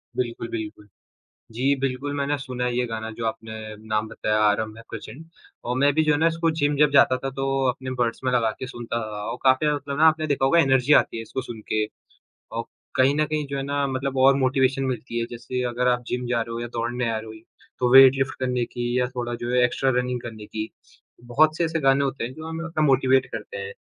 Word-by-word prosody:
बिल्कुल, 120 Hz, -2 st, -3 dB
बिल्कुल, 105 Hz, -2 st, -6 dB, 0.6 s
जी, 130 Hz, +5 st, +1 dB
बिल्कुल, 135 Hz, +2 st, -2 dB
मैंने 140 Hz, +1 st, 0 dB
सुना 125 Hz, -2 st, -5 dB
है 125 Hz, -, -1 dB
ये 125 Hz, -, +1 dB
गाना 110 Hz, 0 st, -5 dB
जो 115 Hz, +1 st, -5 dB
आपने 110 Hz, 0 st, -4 dB, 0.3 s
नाम 110 Hz, 0 st, 0 dB
बताया 105 Hz, 0 st, -1 dB
आरंभ 110 Hz, +1 st, +1 dB
है 115 Hz, -, -11 dB
प्रचंड 115 Hz, +7 st, -9 dB, 0.4 s
औ 120 Hz, -, -1 dB
मैं 140 Hz, +2 st, +3 dB
भी 155 Hz, +1 st, +3 dB
जो 155 Hz, -, +3 dB
है 145 Hz, -, +2 dB
ना 165 Hz, -, +4 dB
इसको 165 Hz, 0 st, +1 dB
जिम 145 Hz, 0 st, +2 dB
जब 150 Hz, 0 st, +4 dB
जाता 130 Hz, -2 st, +5 dB
था 135 Hz, -, -1 dB
तो 135 Hz, +1 st, -3 dB, 0.2 s
अपने 130 Hz, +1 st, -4 dB
बड्स 115 Hz, -1 st, 0 dB
में 130 Hz, -, +1 dB
लगा 115 Hz, -3 st, +2 dB
के 130 Hz, -, -5 dB
सुनता 120 Hz, -2 st, -4 dB
था 105 Hz, 0 st, -5 dB
और 125 Hz, -, -5 dB
काफ़ी 130 Hz, +3 st, +4 dB
ज़्यादा 150 Hz, -, +2 dB
मतलब 140 Hz, 0 st, -6 dB
ना 160 Hz, -, +7 dB
आपने 155 Hz, 0 st, +2 dB
देखा 140 Hz, -2 st, +1 dB
होगा 170 Hz, +5 st, +4 dB
एनर्जी 135 Hz, -1 st, +4 dB
आती -, -, +3 dB
है -, -, -4 dB
इसको 130 Hz, -, -5 dB
सुनके, 110 Hz, -3 st, -3 dB, 0.7 s
औ -, -, -1 dB, 0.3 s
कहीं 130 Hz, +2 st, +4 dB
न 155 Hz, -, +2 dB
कहीं 150 Hz, 0 st, -2 dB
जो 140 Hz, 0 st, -4 dB
है -, -, -2 dB
ना 140 Hz, 0 st, -1 dB
मतलब 135 Hz, 0 st, -3 dB
और 135 Hz, +1 st, +6 dB
मोटिवेशन 130 Hz, 0 st, +2 dB
मिलती 125 Hz, -2 st, -3 dB
है 115 Hz, -, -1 dB
जैसे 120 Hz, +2 st, -4 dB
अगर 125 Hz, +1 st, -1 dB
आप 125 Hz, 0 st, +1 dB
जिम 125 Hz, 0 st, -2 dB
जा 120 Hz, -1 st, +1 dB
रहे 115 Hz, 0 st, -5 dB
हो 115 Hz, -, -4 dB
या 120 Hz, -, -4 dB
दौड़ने 120 Hz, +1 st, -2 dB
आ 115 Hz, -, -1 dB
रहे 110 Hz, -, -7 dB
हो 110 Hz, -, -9 dB
ही 110 Hz, -, -12 dB, 0.4 s
तो 125 Hz, -1 st, +2 dB
वेट 135 Hz, 0 st, +9 dB
लिफ्ट 135 Hz, 0 st, -1 dB
करने 125 Hz, -2 st, 0 dB
की 120 Hz, +1 st, -3 dB
या 125 Hz, -, +2 dB
थोड़ा 120 Hz, -1 st, -3 dB
जो 120 Hz, +1 st, -4 dB
है 125 Hz, 0 st, +4 dB
एक्स्ट्रा 130 Hz, +2 st, 0 dB
रनिंग 125 Hz, 0 st, -1 dB
करने 110 Hz, -3 st, -8 dB
की, 110 Hz, +1 st, -5 dB, 0.5 s
बहुत 155 Hz, +6 st, +3 dB
से -, -, +1 dB
ऐसे 165 Hz, 0 st, -1 dB
गाने 135 Hz, 0 st, +3 dB
होते 135 Hz, -3 st, -2 dB
हैं 120 Hz, -, -4 dB
जो 155 Hz, +3 st, -8 dB
हमें 160 Hz, +1 st, -5 dB
उतना 165 Hz, -2 st, -1 dB
मोटीवेट 130 Hz, -1 st, +4 dB
करते 475 Hz, -, -6 dB
हैं। 465 Hz, 0 st, -5 dB
130 Hz, 245 wpm, -24 LUFS, 120-140 Hz, 0.7 s, वेट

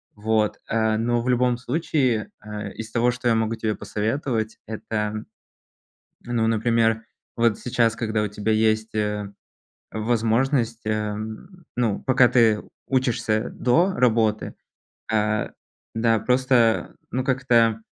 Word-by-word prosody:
Вот. 110 Hz, 0 st, 0 dB
Э, 110 Hz, -1 st, +1 dB
но 120 Hz, +1 st, +1 dB
в 120 Hz, -, -5 dB
любом 125 Hz, 0 st, +2 dB
случае, 125 Hz, -, 0 dB
э, 105 Hz, -1 st, -6 dB
из 110 Hz, 0 st, -7 dB
того, 120 Hz, +2 st, +2 dB
что 125 Hz, 0 st, -4 dB
я 115 Hz, -, +3 dB
могу 110 Hz, 0 st, 0 dB
тебе 110 Hz, -1 st, -2 dB
посоветовать, 110 Hz, 0 st, -2 dB
это, 110 Hz, 0 st, -3 dB, 1.0 s
ну, 120 Hz, -2 st, 0 dB
например, 115 Hz, 0 st, +1 dB, 0.3 s
вот 115 Hz, -2 st, +3 dB
сейчас, 115 Hz, -2 st, +1 dB
когда 110 Hz, -2 st, -1 dB
у -, -, 0 dB
тебя 105 Hz, +2 st, -2 dB
есть, 110 Hz, 0 st, +1 dB
э, 105 Hz, -1 st, -2 dB, 0.6 s
возможность, 115 Hz, +2 st, 0 dB
э, 105 Hz, -1 st, -1 dB, 0.6 s
ну 115 Hz, -5 st, 0 dB
пока 130 Hz, -2 st, +4 dB
ты 115 Hz, -3 st, +3 dB, 0.2 s
учишься 120 Hz, -4 st, 0 dB
до 170 Hz, +10 st, +2 dB
работы, 115 Hz, -, +1 dB, 0.6 s
э, 105 Hz, 0 st, +1 dB, 0.5 s
да, 115 Hz, 0 st, +2 dB
просто 125 Hz, -2 st, +2 dB, 0.2 s
ну 130 Hz, 0 st, -1 dB
как-то, 120 Hz, -4 st, +2 dB
115 Hz, 125 wpm, -23 LUFS, 110-120 Hz, 1.0 s, пока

